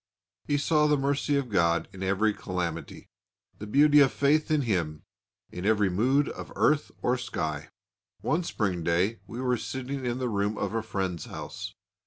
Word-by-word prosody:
He 145 - +1
saw 150 +1 +3
the 150 -1 +3
mercy 140 +1 0
of 140 -3 -1
God 85 -3 +2
in 95 - -10
every 100 +3 +2
calamity, 85 -6 -5 0.5
the 105 - -6
beauty 145 +6 +6
of 140 -2 +6
faith 150 +2 +2
in 155 -2 +2
Him 85 -9 -1 0.5
in 90 - -6
every 105 -2 +3
mood 130 +10 +2
of - - -7
earth 150 0 +2
or 125 0 +2
sky. 75 - -3 0.5
One 160 - +1
spring 100 - -1
day 90 +7 +1
we 120 - -7
were 125 -1 +1
sitting 130 +3 -5
in 120 0 -1
the 130 -1 -1
room 105 -1 -1
of - - -2
a 115 - 0
friend's 95 -5 -3
house. - - -7
115 Hz, 175 wpm, -28 LUFS, 95-140 Hz, 0.5 s, beauty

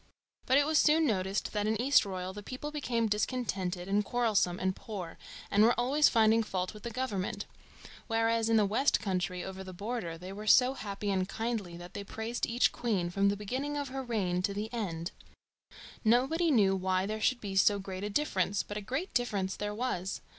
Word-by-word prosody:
But 260 - +5
it 285 - +4
was 310 0 +3
soon 315 +1 +4
noticed 195 -5 -1
that 210 0 0
in 215 0 0
Eastroyal 195 -8 +2
the 205 - -7
people 260 +7 -6
became 250 -6 -1
discontented 200 -5 -2
and 205 +1 +2
quarrelsome 210 -6 +1
and 185 0 0
poor, 190 -6 -7 0.3
and 205 - +4
were 235 +3 +5
always 280 +5 +4
finding 225 -1 +4
fault 185 -3 -3
with 210 - -11
the 235 - -5
government; 210 -5 -3 0.6
whereas 225 0 +1
in 225 - +4
the 210 - +4
west 225 +8 +2
country 180 -3 -2
over 190 0 -6
the 185 -1 -9
border 200 -4 -4
they 180 +3 -8
were 210 +2 -8
so 250 +4 +6
happy 205 -4 -4
and 185 0 0
kindly 220 -7 -3
that 175 0 -10
they 200 - -5
praised 220 +4 -3
each 240 +1 +2
queen 195 -8 -1
from 195 +2 +3
the 200 - -1
beginning 260 +8 -3
of 285 -2 -3
her 265 +1 -4
reign 200 -8 -1
to 200 +2 -1
the 215 +3 -4
end. 175 -6 -3 0.9
Nobody 265 +9 +3
knew 200 -9 +4
why 185 0 0
there 215 +2 -3
should 255 +3 +2
be 200 -3 -5
so 205 +1 +5
great 190 -1 -6
a 205 - -2
difference, 200 -6 0
but 205 - -6
a - - -3
great 265 - -3
difference 200 -6 0
there 210 0 -4
was. 200 -6 -2
210 Hz, 200 wpm, -31 LUFS, 190-240 Hz, 0.9 s, so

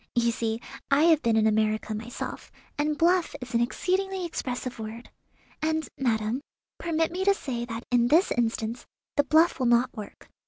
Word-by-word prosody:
You 235 -1 +3
see 225 -1 -2 0.3
I 280 +2 +4
have 325 -2 +5
been 230 -1 +2
in 220 - +4
America 215 0 +1
myself, 225 +3 -6 0.2
and 300 +1 0
'bluff' 350 +2 +2
is 250 -3 -8
an 235 - +3
exceedingly 375 +8 -1
expressive 255 -6 -4
word. 220 +2 -7 0.5
And, 315 -1 0
madam, 230 -1 0 0.4
permit 325 -1 0
me 370 +2 -2
to 400 0 +4
say 240 -9 -4
that 230 0 -6
in 240 -1 +4
this 325 +8 +4
instance 230 0 -1 0.3
the 290 - +4
bluff 315 +3 +4
will 255 - +2
not 240 +2 +3
work. 210 -3 -9
250 Hz, 170 wpm, -27 LUFS, 230-315 Hz, 0.5 s, have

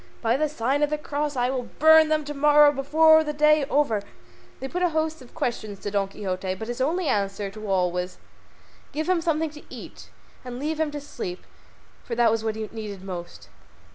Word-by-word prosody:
By 230 +1 +3
the 305 +2 0
sign 275 +1 -1
of 295 - +3
the 300 - -1
Cross 295 0 -3
I 250 0 +1
will 250 -3 -4
burn 315 0 +7
them 310 -1 +1
to 295 - -5
morrow 295 +1 +6
before 315 +3 +5
the 300 -1 -3
day 300 +1 +4
is 275 - -2
over." 255 -8 +2 0.6
They 265 - -4
put 355 +6 -4
a 355 - +3
host 315 -1 -2
of 250 - -16
questions 230 -9 -3
to 205 - -5
Don 200 -1 +1
Quixote, 190 -1 -4
but 220 +4 -7
his 240 +1 -4
only 330 +5 0
answer 200 -2 -1
to 215 0 -8
all 180 -2 +2
was 180 +1 -4 0.8
give 310 +1 -2
him 365 -2 +2
something 320 -2 0
to 300 0 -12
eat, - - -11 0.3
and 250 -1 -7
leave 305 +4 -3
him 315 -1 +1
to 295 0 -6
sleep, 185 -10 -7 0.6
for 235 - -4
that 235 -1 +4
was 225 0 -1
what 220 -1 -1
he 220 -1 -4
needed 210 -4 -7
most. 175 -3 -8
270 Hz, 215 wpm, -25 LUFS, 215-305 Hz, 0.8 s, burn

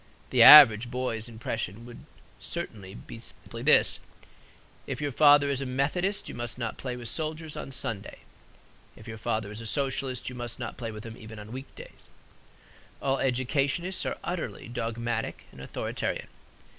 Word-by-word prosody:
The - - +3
average 120 -6 +10
boy's 120 -3 -3
impression 115 0 -6 0.3
certainly 110 - -6
would - - -12
be 115 - -9
simply 115 - -4
this: - - +6 0.9
"If 135 -1 -4
your 145 -1 -2
father 145 +1 +6
is 140 -1 -2
a - - -3
Methodist 165 +10 -1
you - - -7
must 120 0 -5
not 115 -3 -3
play 125 -2 -4
with 120 -1 -7
soldiers 155 +3 -4
on - - -7
Sunday. 115 -6 -5 0.7
If - - -14
your 110 -1 -7
father 110 -1 -2
is 105 +2 -8
a 115 - -5
Socialist 135 -1 -2
you 125 - -4
must 120 -1 -5
not - - -6
play 115 -2 -5
with 105 0 -9
them 115 0 -9
even 110 -1 -11
on 105 +1 -10
week 130 +2 -9
days." - - -13 0.9
All 135 0 0
educationists 140 +8 0
are - - -3
utterly 175 -7 -4
dogmatic 115 -1 -3
and 65 - -13
authoritarian. 65 - -4
125 Hz, 165 wpm, -28 LUFS, 115-140 Hz, 0.9 s, average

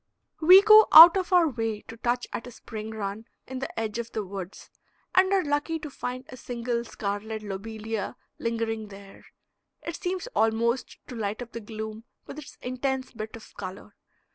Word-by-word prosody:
We 365 +5 +8
go 435 +1 +8
out 330 +3 +11
of 380 -1 -2
our 355 -3 +5
way 225 -6 -3
to 225 - -11
touch 240 +2 -1
at 230 - -5
a - - -9
spring 220 -2 -8
run 215 0 -5 0.2
in 260 0 -6
the 270 - -5
edge 225 0 -3
of 235 0 -5
the 215 -2 -3
woods, 190 -1 -8 0.4
and 375 +1 +4
are 390 -2 +3
lucky 290 +2 -1
to 305 -2 -8
find 250 0 -5
a 255 - -10
single 235 -1 -3
scarlet 215 0 -5
lobelia 215 +1 -5 0.2
lingering 225 -1 -2
there. 195 -1 -14 0.6
It 335 - -5
seems 365 +2 -3
almost 230 +3 0
to - - -9
light 215 +1 -3
up 235 - -14
the 230 - -6
gloom 220 +1 -7 0.2
with 305 - -9
its 285 - -12
intense 260 +1 -3
bit 220 -1 -7
of 225 - -13
color. 190 +2 -8
230 Hz, 180 wpm, -26 LUFS, 215-270 Hz, 0.6 s, out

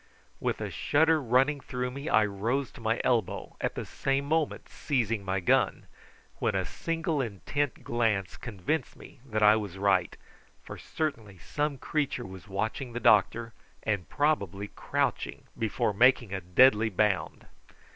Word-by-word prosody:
With - - -1
a - - -3
shudder 160 +1 +3
running 135 +4 +2
through 125 -1 -4
me 140 +3 -5
I 110 - +5
rose 115 +7 -1
to - - -13
my 110 +1 0
elbow, 120 -3 0
at - - -1
the - - -4
same 135 +1 -1
moment 155 0 -1
seizing 115 -7 -1
my 95 0 -1
gun, 90 - +2 0.5
when - - 0
a - - 0
single 165 -3 -2
intent 130 +5 -3
glance 110 -5 0
convinced 120 - -3
me 140 - -14
that 110 -5 -1
I 105 +1 +7
was 100 -4 -5
right, 100 0 +1 0.5
for - - -8
certainly 115 -11 -4
some 145 - -2
creature 150 +2 -2
was 95 +1 -10
watching 110 +6 -3
the 120 - -3
doctor, 115 +1 +3 0.3
and 100 -7 -1
probably 105 - 0
crouching - - -2
before 110 -1 0
making 120 -1 +4
a 95 - -3
deadly 110 +5 +5
bound. 100 -1 0
115 Hz, 150 wpm, -29 LUFS, 100-140 Hz, 0.5 s, I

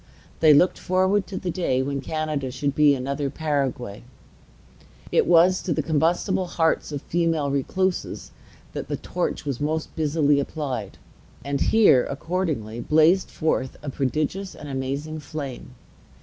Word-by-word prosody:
They 155 -1 +6
looked 150 +5 +4
forward 185 +2 +1
to 195 - -6
the 180 - -3
day 145 -8 0
when 140 0 -3
Canada 155 -2 -2
should 140 +2 -2
be 145 -1 +5
another 140 +2 -2
Paraguay. 135 -8 -2 1.1
It - - +3
was 175 +2 +5
to 175 - -1
the - - -1
combustible 170 +4 +1
hearts 160 -2 0
of 145 -2 -5
female 165 -4 0
recluses 185 +7 -2 0.4
that - - -5
the - - -2
torch - - -3
was 140 -2 -3
most 155 +2 -2
busily 150 -2 +2
applied; 140 -2 -4 0.5
and 140 0 -2
here, 210 - +5
accordingly, 145 - -3
blazed 160 +8 +3
forth 135 -5 -1
a 145 - -4
prodigious 155 +9 -2
and 150 - -9
amazing 140 +3 -3
flame. 140 -4 -7
150 Hz, 140 wpm, -24 LUFS, 140-170 Hz, 1.1 s, They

